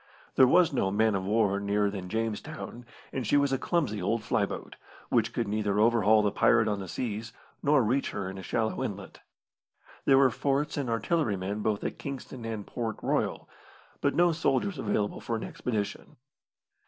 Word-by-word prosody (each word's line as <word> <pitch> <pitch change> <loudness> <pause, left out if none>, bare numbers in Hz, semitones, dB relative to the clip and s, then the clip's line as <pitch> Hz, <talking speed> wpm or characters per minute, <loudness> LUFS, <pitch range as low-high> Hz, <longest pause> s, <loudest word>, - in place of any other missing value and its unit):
There 130 - +6
was 170 +2 +4
no 95 -7 +1
man 110 +2 +2
of 95 -1 -1
war 105 -1 +2
nearer 100 0 +1
than 95 -3 -6
Jamestown, 115 +3 -4 0.3
and 130 -5 -2
she 145 - +4
was 140 -1 +2
a 135 - 0
clumsy 135 - 0
old 110 +4 0
fly - - +1
boat, - - -7 0.3
which - - +2
could 115 - -2
neither 105 -1 0
overhaul 110 -1 +4
the 105 - +2
pirate 110 +2 +4
on 105 -2 0
the 95 - -6
seas, 110 +2 -4 0.3
nor 145 -2 +4
reach 130 +6 +1
her 100 -2 -4
in 95 +1 -6
a - - -6
shallow 110 +4 -1
inlet. - - -6 0.9
There 135 - +6
were 135 -2 +5
forts 140 +5 0
and 140 -5 -2
artillerymen 105 - 0
both 105 -1 -1
at - - -4
Kingston 130 -3 -7
and 110 -3 -4
Port 115 -2 -3
Royal, - - -1 0.5
but 140 - +1
no 175 0 +4
soldiers 160 +2 0
available 105 -3 -1
for 115 - -2
an 110 - -4
expedition. 105 -5 -4
110 Hz, 180 wpm, -29 LUFS, 105-135 Hz, 0.9 s, There